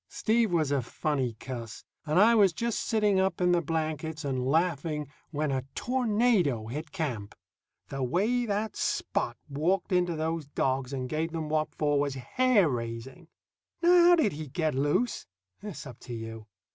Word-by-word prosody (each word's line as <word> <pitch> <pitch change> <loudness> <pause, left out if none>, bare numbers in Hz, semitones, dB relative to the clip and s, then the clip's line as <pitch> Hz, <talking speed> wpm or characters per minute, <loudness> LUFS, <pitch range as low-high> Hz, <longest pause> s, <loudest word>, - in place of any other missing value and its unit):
Steve 225 -2 +1
was 155 -5 +1
a 140 -2 +2
funny 130 -1 -2
cuss, 120 -4 -7 0.2
and 155 +3 +1
I 225 +4 +7
was 200 -6 +5
just 235 +5 -1
sitting 210 -4 +2
up 190 -2 +1
in 180 -1 +3
the 175 -1 +3
blankets 160 -1 -3
and 130 -2 -1
laughing 155 -1 0 0.2
when 150 -1 -1
a 130 -1 -1
tornado 220 - +1
hit 150 +7 -6
camp. 130 - -4 0.5
The 135 - -4
way 210 - +1
that 210 +1 -1
Spot - - -1
walked 165 +8 0
into 175 -2 +2
those 160 -1 -2
dogs 130 -2 -1
and 130 -2 -3
gave 160 +4 -2
them 160 -2 -3
what 155 0 -1
for 145 -1 +1
was 140 -1 -1
hair 215 - +3
raising. 120 +5 -5 0.6
Now 350 +1 +6
how 350 - +8
did 310 - +2
he 155 0 -6
get 155 +3 -1
loose? 145 - 0 0.3
It's 205 -7 -7
up 125 - -10
to 120 - -7
you. 115 -1 -7
155 Hz, 170 wpm, -29 LUFS, 135-190 Hz, 0.6 s, how